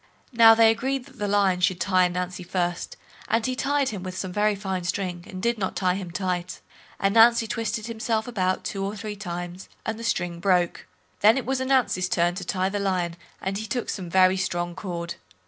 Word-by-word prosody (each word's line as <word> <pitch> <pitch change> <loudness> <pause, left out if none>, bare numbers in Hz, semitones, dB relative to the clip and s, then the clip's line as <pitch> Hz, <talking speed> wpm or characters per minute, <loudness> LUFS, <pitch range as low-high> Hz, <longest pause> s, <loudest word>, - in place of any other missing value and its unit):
Now 230 -2 +8
they 225 0 +6
agreed 260 +3 -2
that 260 -2 -17
the 205 - -1
Lion 200 -3 +2
should 180 -1 +1
tie 185 0 +3
Ananzi 180 0 -4
first, 175 -1 -2 0.3
and 230 0 +1
he 255 -1 -1
tied 280 +1 +1
him 205 -4 -5
with 185 0 -6
some 185 -2 -4
very 210 +1 +2
fine 190 -2 -3
string, 175 -1 -3
and 185 - -7
did 235 +2 0
not 190 - -2
tie 185 -2 +1
him 185 -1 -5
tight. 180 0 -3 0.4
Ananzi 225 +3 +5
twisted 225 -1 -2
himself 225 -1 -2
about 185 -6 -1
two 195 -1 -3
or 200 +2 -3
three 210 0 -5
times, 175 -2 -6 0.2
and 220 0 -3
the - - -7
string 175 -7 -1
broke. 180 -2 +1 0.3
Then 215 +5 +6
it 265 - -2
was 265 0 -1
Ananzi's 255 -9 +1
turn 175 -1 +2
to 185 - -5
tie 185 0 0
the 205 +1 -2
Lion, 180 -4 -1 0.3
and 195 +1 -2
he 220 - -5
took 240 +2 -2
some 185 -4 -4
very 185 +1 +4
strong 175 -2 -2
cord. 175 -2 -5
195 Hz, 205 wpm, -25 LUFS, 180-225 Hz, 0.4 s, Now